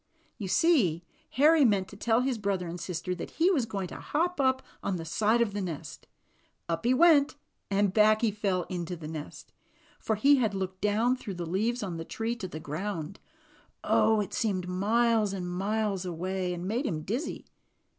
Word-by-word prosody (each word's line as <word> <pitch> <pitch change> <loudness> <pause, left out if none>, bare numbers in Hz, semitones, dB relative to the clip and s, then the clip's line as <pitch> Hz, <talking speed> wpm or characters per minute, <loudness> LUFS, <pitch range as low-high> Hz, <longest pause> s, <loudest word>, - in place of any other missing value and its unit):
You 200 - -4
see 195 - +3 0.3
Harry 300 +4 +5
meant 200 -6 +3
to - - -11
tell 225 +3 +2
his 255 -3 -1
brother 195 -3 -1
and 170 +1 -6
sister 180 +1 -3
that 180 - -6
he 345 +4 +4
was 265 -11 +1
going 200 -3 -3
to - - -8
hop 340 +1 -1
up 260 0 +2 0.2
on 195 - -1
the 165 -2 -5
side 215 +7 +2
of 205 -4 -4
the 205 - -2
nest. 160 -5 -6 0.6
Up 165 +3 -2
he 245 - +4
went, 290 +1 +5 0.3
and 200 -1 +2
back 215 +1 +5
he 230 -3 +2
fell 195 -3 -1
into 175 0 -4
the 160 -2 -8
nest; 155 -1 -8 0.5
for 220 - -1
he 280 +7 +5
had 220 -6 0
looked 190 -1 -4
down 220 +5 +2
through 215 -7 -7
the 175 -1 -4
leaves 215 +8 -1
on 180 -4 -4
the 165 - -4
tree 225 +7 -3
to 190 - -5
the 155 -3 -7
ground. 165 +3 -5 0.6
Oh! 220 -1 +3
it 200 - -5
seemed 190 -5 -1
miles 215 +3 +2
and 180 -2 -4
miles 195 +2 -1
away, 180 +1 -3
and 175 +1 -4
made 240 +7 -1
him 155 -2 -3
dizzy. 235 - -4
200 Hz, 195 wpm, -29 LUFS, 180-235 Hz, 0.6 s, Harry